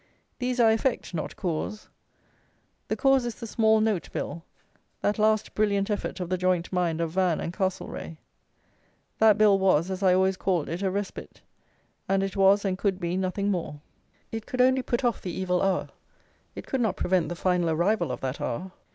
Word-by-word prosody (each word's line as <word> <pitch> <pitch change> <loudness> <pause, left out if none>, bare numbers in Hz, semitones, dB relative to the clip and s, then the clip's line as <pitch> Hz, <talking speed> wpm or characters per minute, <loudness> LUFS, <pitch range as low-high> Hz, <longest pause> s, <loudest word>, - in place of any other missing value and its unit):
These 250 0 -1
are 225 -2 +6
effect; 225 -2 -1
not 160 - -4
cause. 180 +5 -3 1.0
The - - -1
cause 270 -2 +3
is 240 -2 -4
the 235 - -8
Small 220 0 +3
note 215 -5 0
Bill, 165 +3 -4 0.6
that 205 +1 0
last 215 0 +2
brilliant 205 -1 +1
effort 205 - -3
of 180 - -3
the 185 +1 -1
joint 180 -1 0
mind 170 -3 0
of 165 -1 -1
Van 180 -2 +1
and 170 - -4
Castlereagh. 185 -4 -3 1.0
That 220 -2 +6
Bill 210 -2 +5
was, 185 -2 +2
as 190 +1 -4
I 185 -2 +4
always 190 0 +2
called 180 -6 0
it, 170 +4 -4
a 195 - +1
respite; 200 +1 -5 0.7
and 195 0 +2
it 195 +1 -3
was, 195 +1 +4
and 185 -1 -1
could 195 -3 0
be, 175 0 -2
nothing 190 +2 -1
more. 165 -5 -3 0.5
It 225 -1 -5
could 255 - -5
only 260 +1 +4
put 245 0 -2
off 240 -2 0
the 180 - -4
evil 180 0 -1
hour; 195 -1 0 0.7
it - - -7
could 265 - -1
not 210 -5 0
prevent 180 -4 +1
the 175 - -4
final 180 -1 +1
arrival 175 +7 +1
of - - -5
that 130 +1 -4
hour. 185 +11 -3
190 Hz, 190 wpm, -26 LUFS, 180-215 Hz, 1.0 s, are